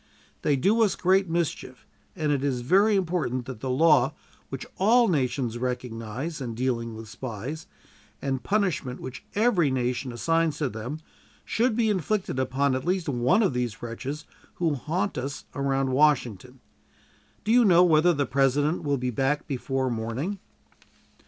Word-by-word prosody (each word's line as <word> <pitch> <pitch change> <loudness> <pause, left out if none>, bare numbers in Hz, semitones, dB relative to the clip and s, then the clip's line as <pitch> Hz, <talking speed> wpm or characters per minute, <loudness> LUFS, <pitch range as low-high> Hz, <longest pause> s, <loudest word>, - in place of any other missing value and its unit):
They 145 - +2
do 200 - +2
us 215 -3 +3
great 190 0 +2
mischief; 165 -7 -3 0.3
and 155 -4 0
it 140 -2 0
is 130 -3 0
very 200 - +4
important 160 -10 -1
that 130 -4 -7
the 130 - -4
law 150 0 +4 0.3
which 135 -1 -6
all 230 +5 +5
nations 125 -6 0
recognize 125 +4 -4
in 120 -3 -4
dealing 115 -2 -2
with 110 0 -9
spies, 130 +7 -6 0.5
and 135 -1 -1
the - - -11
punishment 175 - -1
which 130 - -8
every 205 -8 +3
nation 125 0 -1
assigns 165 +5 0
to 145 -4 -1
them, 120 +8 -6 0.4
should 235 0 +1
be 225 -2 +2
inflicted 190 -5 -1
upon 130 +2 +1
at 130 0 -2
least 180 0 -1
one 125 - +3
of 190 - +1
these 120 -3 -3
wretches 135 +6 -5 0.3
who 165 -3 0
haunt 170 +6 -2
us 135 +3 -5
around 135 -1 0
Washington. 130 -4 +1 0.8
Do 215 - 0
you 245 +1 +6
know 180 -4 +6
whether 170 0 +5
the 145 -4 0
President 140 +5 +1
will 145 -2 +1
be 125 0 -2
back 135 +4 0
before 135 -2 -2
morning?" 120 - -3
140 Hz, 160 wpm, -26 LUFS, 125-170 Hz, 0.8 s, you